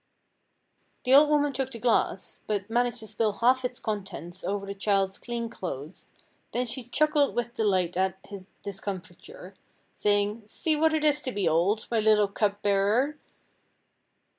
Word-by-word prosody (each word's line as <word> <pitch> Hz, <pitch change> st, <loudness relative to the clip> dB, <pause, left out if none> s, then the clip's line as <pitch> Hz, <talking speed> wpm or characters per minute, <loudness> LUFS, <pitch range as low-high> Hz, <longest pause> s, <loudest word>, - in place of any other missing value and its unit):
The 255 Hz, -, +3 dB
old 295 Hz, +2 st, +8 dB
woman 290 Hz, -1 st, +2 dB
took 265 Hz, 0 st, -2 dB
the 235 Hz, -, -6 dB
glass, 235 Hz, +1 st, 0 dB
but 205 Hz, 0 st, -2 dB
managed 240 Hz, 0 st, 0 dB
to -, -, -8 dB
spill 215 Hz, -1 st, 0 dB
half 255 Hz, +4 st, +3 dB
its 250 Hz, 0 st, -3 dB
contents 190 Hz, -, -5 dB
over 200 Hz, +1 st, -2 dB
the 200 Hz, -, -5 dB
child's 195 Hz, -1 st, 0 dB
clean 235 Hz, -1 st, -4 dB
clothes, 170 Hz, -, -7 dB, 0.4 s
then 250 Hz, +1 st, 0 dB
she 250 Hz, +1 st, -4 dB
chuckled 295 Hz, +3 st, +2 dB
with 240 Hz, 0 st, -2 dB
delight 190 Hz, -7 st, +1 dB
at 190 Hz, 0 st, 0 dB
his 195 Hz, -2 st, -9 dB, 0.2 s
discomfiture, 200 Hz, -, -7 dB, 0.4 s
saying 205 Hz, +1 st, 0 dB
"see 310 Hz, +8 st, +1 dB
what 315 Hz, +1 st, +3 dB
it 310 Hz, -1 st, 0 dB
is 295 Hz, -1 st, +3 dB
to 260 Hz, -, -3 dB
be 200 Hz, -6 st, -1 dB
old, 180 Hz, +7 st, +2 dB
my 230 Hz, -, +2 dB
little 210 Hz, -1 st, +4 dB
cup 205 Hz, 0 st, -1 dB
bearer." 210 Hz, +9 st, +2 dB
215 Hz, 160 wpm, -27 LUFS, 195-250 Hz, 0.4 s, old